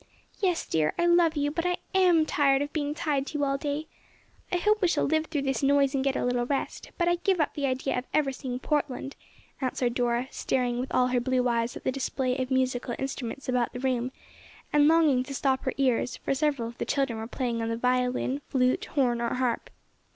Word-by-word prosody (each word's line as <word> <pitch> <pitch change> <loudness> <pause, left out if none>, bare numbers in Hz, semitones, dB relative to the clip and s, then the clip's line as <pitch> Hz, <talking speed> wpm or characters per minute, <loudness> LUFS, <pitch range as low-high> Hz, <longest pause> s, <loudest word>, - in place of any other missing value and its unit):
"Yes, 365 -4 +1
dear, 155 -1 0
I 345 - +2
love 345 -2 +4
you 290 0 +1
but 335 +2 -2
I 360 0 0 0.2
am 355 -4 +4
tired 275 -2 +3
of 290 - -7
being 295 -1 -2
tied 285 -3 -1
to 305 - -4
you 290 - 0
all 275 0 0
day. 290 +1 -2 0.7
I 360 - +2
hope 425 +4 +2
we 365 - +4
shall 340 - +1
live 315 +1 +1
through 290 -3 -2
this 270 -4 -1
noise 275 0 +3
and 270 -1 0
get 270 -1 +1
a - - 0
little 245 -1 0
rest, 275 0 -3
but 345 - +1
I 345 0 +3
give 365 +1 +1
up 305 - +1
the 280 -2 -1
idea 260 +1 -1
of 250 - -9
ever 295 -3 +2
seeing 260 -2 -5
Portland," 280 -1 -2 0.5
answered 250 -2 0
Dora, 240 +1 0
staring 245 -2 -1
with 255 - -4
all 250 0 +3
her 250 0 +2
blue 255 0 +1
eyes 235 0 0
at - - -12
the - - +1
display 260 -1 -1
of 255 0 -2
musical 255 -2 0
instruments 270 -1 -5
about 250 -2 0
the 250 - -5
room, 255 -1 -1 0.6
and 295 0 +5
longing 310 -5 +4
to 270 +2 -6
stop 265 -1 0
her 260 - 0
ears, 255 -3 +1
for - - -1
several 280 -4 0
of 235 +1 -10
the - - -1
children 270 -5 0
were 220 - -5
playing 240 -2 -2
on 225 - -2
the 230 - -1
violin, 250 +2 0
flute, 255 -1 +1
horn 245 -5 0
or 235 - -1
harp. 250 -2 -1
270 Hz, 225 wpm, -27 LUFS, 250-295 Hz, 0.7 s, and